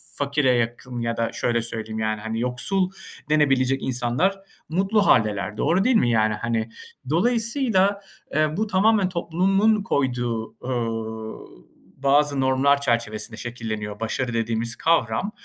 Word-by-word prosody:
fakire 140 -1 +1
yakın 120 +1 -3
ya 115 0 -2
da 115 - -1
şöyle 120 -1 0
söyleyeyim 110 -1 -5
yani 110 -1 -1
hani 110 +1 -3
yoksul 180 - 0 0.4
denebilecek 135 -3 +2
insanlar 130 +10 0 0.3
mutlu 195 +5 +2
hâldeler, 105 -2 +2
doğru 180 +4 +2
değil 255 0 +3
mi 120 - +3
yani, 110 -2 +2
hani. 115 +1 -2 0.4
Dolayısıyla, 225 - +2 0.3
eee, 155 +1 +1
bu 215 +1 0
tamamen 205 0 +3
toplumun 195 +5 +1
koyduğu, 120 -8 -1
ııı, 115 - -5 0.4
bazı 140 0 +3
normlar 135 +2 +3
çerçevesinde 115 -3 -1
şekilleniyor 110 -3 -5
başarı 120 +2 -2
dediğimiz 115 +1 -1
kavram. 165 - +1
125 Hz, 125 wpm, -23 LUFS, 115-180 Hz, 0.4 s, değil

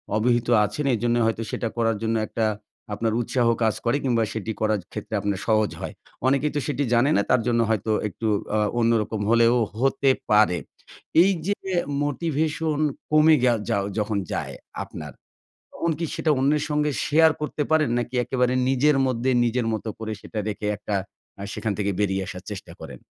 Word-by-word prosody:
অবহিত 120 +2 +2 0.2
আছেন 105 +9 -4
এজন্য 120 +2 0
হয়তো 115 0 0
সেটা 115 - -2
করার 115 -2 +1
জন্য 115 0 0
একটা 115 - -1 0.5
আপনার 110 +2 -1
উৎসাহ 120 +1 0 0.2
কাজ 110 -2 +2
করে 120 +4 +2
কিংবা 120 -4 +2
সেটি 110 0 -3
করার 110 -1 +2
ক্ষেত্রে 105 +1 -7
আপনার 100 -2 -1
সহজ 110 -2 +2
হয়। - - -5 0.3
অনেকেই 140 +2 +2
তো - - +2
সেটি 145 -1 -1
জানে 120 +4 +4
না - - +4
তার 125 - +4
জন্য 120 -1 +2
হয়তো 110 0 0 0.2
একটু 110 +3 -4 0.3
আ - - +2 0.2
অন্যরকম 115 -2 +1
হলেও 115 +1 +5 0.3
হতে 135 +1 +2 0.2
পারে। 105 -4 +5 0.6
এই 190 +3 +5 0.2
যে 205 - +1 0.5
মোটিভেশন 155 +1 -1 0.3
কমে 155 +1 +6
গেও 120 -2 +4
যাও 100 - +1
যখন 105 -1 0
যায় - - -3 0.3
আপনার, - - -8 0.6
তখন 170 - -1
কি 170 - -1
সেটা 155 - +1
অন্যের 145 +3 +2
সঙ্গে 150 0 +1
শেয়ার 160 +2 +5
করতে 150 0 -2
পারেন? 155 -3 +3
নাকি 120 +1 -4
একেবারে 125 0 0 0.2
নিজের 135 +2 +3
মধ্যে 130 +1 0
নিজের 120 0 0
মত 110 - -4
করে 110 -1 -4
সেটা 110 - -5
রেখে 105 0 -4
একটা 105 0 -3 0.4
আ - - -7
সেখান 110 - -2
থেকে 100 -1 0
বেরিয়ে 95 -2 0
আসার 90 -1 -7
চেষ্টা 100 - -7
করেন? - - -9
120 Hz, 175 wpm, -24 LUFS, 110-145 Hz, 0.6 s, কমে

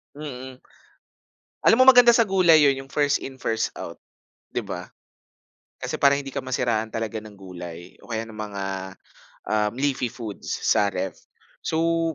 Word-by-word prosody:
Mm. 130 -3 -8 1.1
Alam 240 - +6
mo - - +9
maganda 245 -2 +8
sa 230 -2 +4
gulay 180 -5 +5
'yon 135 -1 +1
yung 135 - -20
1st 145 -1 +2
in 130 -1 -9
1st 110 -1 -1
out. - - -8 0.5
'Di - - -3
ba? - - -6 0.9
Kasi - - -3
para 140 0 +4
hindi 135 -1 -8
ka - - -2
masiraan 120 -4 -1
talaga 115 0 -3
ng 105 -1 -12
gulay 90 -2 -9
o - - -12
kaya 115 0 -2
ng 110 - -11
mga, 105 -2 -5 0.9
um, 105 -1 +1
leafy 135 -1 0
foods 110 -4 -8 0.2
sa 105 - +3
ref. 95 0 -3 0.5
So, 165 0 +1
130 Hz, 160 wpm, -24 LUFS, 110-150 Hz, 1.1 s, mo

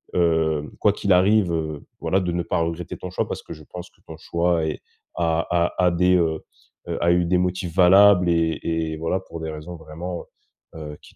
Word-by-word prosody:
heu 80 -3 +1
quoi 105 - +4
qu'il 100 -2 +1
arrive, 95 +1 +4
heu, 80 -2 -3 0.2
voilà, 95 - +1
de 90 -2 -2
ne 85 - -1
pas 85 - -1
regretter 85 +1 -4
ton 90 - -7
choix 90 - -2
parce - - -5
que - - -9
je 75 - -13
pense 90 +3 -9
que - - -32
ton 80 - -10
choix 85 0 0
est 80 - -4 0.3
a 85 -1 0
a 85 +1 +1
a 90 - +4
des, 90 +1 +3
heu 80 -2 0 0.5
heu - - -2
a 85 0 +3
eu 90 0 +2
des 90 +1 +2
motifs 90 -1 -2
valables 95 0 +6
et 80 -2 +1
et 80 -1 -2
voilà 80 +4 -1
pour 85 -3 -9
des 80 - -4
raisons 80 +3 -8
vraiment, 85 +3 -7 0.5
heu - - -8
heu - - -12
qui - - -18
85 Hz, 220 wpm, -23 LUFS, 80-90 Hz, 0.5 s, valables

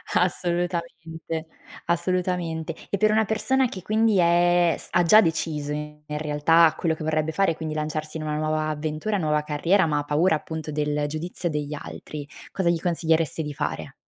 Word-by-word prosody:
Assolutamente, 170 -2 -2 0.4
assolutamente. 175 -2 -1
E 200 - 0
per 215 +2 +3
una 220 0 +3
persona 255 +5 +1
che 190 -5 -8
quindi 215 +2 +2
è 175 0 +4
s - - -7
ha 175 - +3
già 210 +6 +7
deciso 160 -4 -1
in 150 0 -5
realtà 150 +2 +3
quello 165 -2 0
che 155 - -7
vorrebbe 155 0 0
fare 195 +2 +2
e - - -4
quindi 155 -1 -4
lanciarsi 155 0 -3
in 155 - -5
una 150 -1 -2
nuova 155 0 0
avventura, 155 +7 -2
nuova 150 -4 +1
carriera, 165 +6 +2
ma 150 -2 0
ha - - -2
paura 155 +4 +2
appunto 160 0 -5
del 150 0 -1
giudizio 170 +3 -3
degli 150 -1 -3
altri, 145 0 -7 0.2
cosa 190 -3 0
gli 170 -1 +1
consiglieresti 165 -3 +1
di 150 -1 -5
fare? - - -4
160 Hz, 175 wpm, -24 LUFS, 150-175 Hz, 0.4 s, già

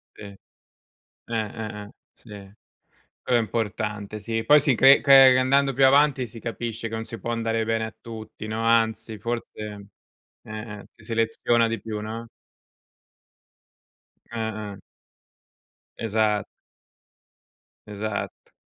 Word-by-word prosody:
Sì. - - -12
Eh, 100 -1 -11 0.9
eh, 110 -1 -4
eh. 105 - -13 0.2
Sì, 120 - -21 0.9
quello 125 - +2
è - - +2
importante, 105 -2 -3
sì. 115 +1 -3
Poi, 150 +1 +6
si 140 -2 +2
cre 135 +4 +7
cre 135 -2 +8
andando 135 +2 +3
più 135 +1 +4
avanti, 135 -2 +4
si 115 +1 -11
capisce 115 0 -5
che 115 - -9
non 110 0 -4
si 115 - -8
può 115 +5 -4
andare 115 -1 -1
bene 115 0 0
a 110 - -9
tutti, 110 -1 -9
no, 110 +1 -3
anzi, 115 -1 +1
forse 115 +3 -4
eh, 105 -1 -8 0.6
eh, 110 -1 -7
si - - -21
seleziona 115 0 +1
di 115 0 -3
più, 110 -1 -5
no? 115 +2 -6 2.0
Eh, 120 - -6 0.4
eh. - - -13 1.2
Esa 110 -2 +1 1.4
Esatto. 105 0 -5
115 Hz, 130 wpm, -24 LUFS, 110-120 Hz, 2.0 s, cre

